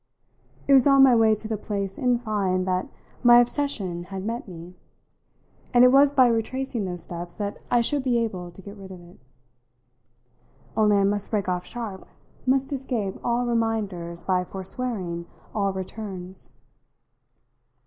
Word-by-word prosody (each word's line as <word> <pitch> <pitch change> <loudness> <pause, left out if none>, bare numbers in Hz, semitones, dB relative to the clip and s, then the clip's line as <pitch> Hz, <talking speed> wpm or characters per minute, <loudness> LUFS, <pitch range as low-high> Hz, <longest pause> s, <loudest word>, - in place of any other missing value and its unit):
It 280 - +5
was 265 0 +6
on 275 -1 +7
my 260 -2 +7
way 220 -1 +4
to 215 +1 -7
the 220 -1 -2
place, 200 -3 -3
in 250 -2 +1
fine, 200 -6 -1
that 185 0 -1 0.3
my 240 -1 +8
obsession 235 -9 -1
had 190 +1 -6
met 230 +1 -4
me, 175 -1 -10 1.0
and 245 - +8
it 250 - +7
was 275 +1 +6
by 265 -3 +5
retracing 235 0 -1
those 175 -2 -5
steps 175 0 -7
that 205 -1 -4
I 240 - +4
should 285 +4 +1
be 255 -2 +1
able 190 -7 -2
to 175 +2 -14
get 200 +2 -10
rid 195 -1 -11
of 185 -1 -10
it. 175 +1 -17 1.6
Only 210 -2 +4
I 200 - +3
must 205 0 0
break 205 -4 -1
off 180 -1 -2
sharp, 220 -6 -7 0.4
must 270 +2 +2
escape 245 -8 -3
all 240 +1 0
reminders 205 -8 -2
by 185 -1 +1
forswearing 185 -3 -4 0.3
all 200 -2 0
returns. 190 -1 -7
210 Hz, 160 wpm, -25 LUFS, 185-240 Hz, 1.6 s, my